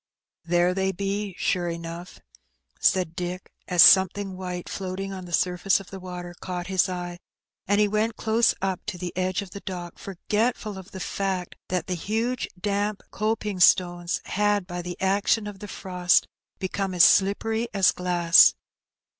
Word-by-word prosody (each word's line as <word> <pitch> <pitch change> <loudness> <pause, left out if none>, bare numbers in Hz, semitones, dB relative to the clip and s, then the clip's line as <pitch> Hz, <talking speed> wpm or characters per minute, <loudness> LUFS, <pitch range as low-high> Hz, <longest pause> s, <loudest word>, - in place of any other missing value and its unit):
• - - -15
"There 175 +1 +3
they 190 0 0
be, 200 +1 -3
sure 175 -1 0
enough," 170 +1 -7 0.6
said 180 -3 +2
Dick, 180 0 -5 0.2
as 180 -1 +6
something 190 +1 +5
white, 180 -1 -5
floating 195 0 -5
on 185 -1 -7
the 175 - -11
surface 180 +3 +2
of 195 - -13
the 195 - -7
water, 180 -1 -7
caught 180 -1 -5
his 190 0 +1
eye, 175 -1 -5 0.5
and 205 +1 +2
he 210 - +4
went 215 +2 0
close 225 +1 +2
up 190 -2 -2
to 200 -4 -4
the 175 -1 -6
edge 185 +2 -1
of 190 - -13
the 200 - -7
dock, 175 -3 -7
forgetful 210 +2 -2
of 190 - -12
the 190 - -9
fact 190 -1 -3
that 180 -1 -2
the 185 - -3
huge 225 +8 -2
damp 205 +1 -1
coping 210 -2 -2
stones 175 -1 +3
had, 205 -1 +1
by 175 -1 -5
the 175 0 -7
action 200 +3 +1
of 205 -2 -8
the 210 - -8
frost, 180 -3 +1 0.3
become 190 0 -3
as 175 - +6
slippery 220 +4 +3
as 195 -2 +4
glass. 175 -1 +5
190 Hz, 170 wpm, -25 LUFS, 180-200 Hz, 0.6 s, as